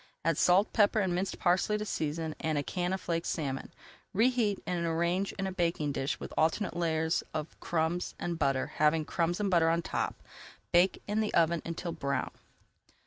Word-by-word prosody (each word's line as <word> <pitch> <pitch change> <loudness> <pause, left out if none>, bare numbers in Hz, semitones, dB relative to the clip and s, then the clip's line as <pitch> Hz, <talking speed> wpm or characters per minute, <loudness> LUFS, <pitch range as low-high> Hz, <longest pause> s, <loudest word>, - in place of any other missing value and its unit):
Add 165 - +3
salt, 185 +4 +4
pepper 215 0 +4
and 190 -3 +1
minced 185 +2 -2
parsley 185 +4 +2
to 210 - -4
season, 160 -3 -2
and 155 -1 -1
a 145 - 0
can 180 +4 -2
of 190 - -1
flaked 165 -2 -2
[Page - - 0
301] 135 -5 -3
salmon. - - -30 0.4
Reheat 225 -2 +2
and 175 -1 -1
arrange 170 +4 0
in 195 - -3
a 190 - -2
baking 170 -5 0
dish 135 0 -2
with - - -7
alternate 165 +5 +1
layers 160 -1 +1
of 155 0 -4
crumbs 170 +1 -1
and 170 -1 -3
butter, 135 -3 +2
having 155 +1 +3
crumbs 170 +3 0
and 200 -2 0
butter 165 -2 +4
on 165 +1 +1
top. - - -3 0.5
Bake 175 +2 +3
in 210 +1 0
the 215 -1 0
oven 170 0 +3
until 170 +1 -4
brown. 140 -4 -2
170 Hz, 195 wpm, -31 LUFS, 160-190 Hz, 0.5 s, salt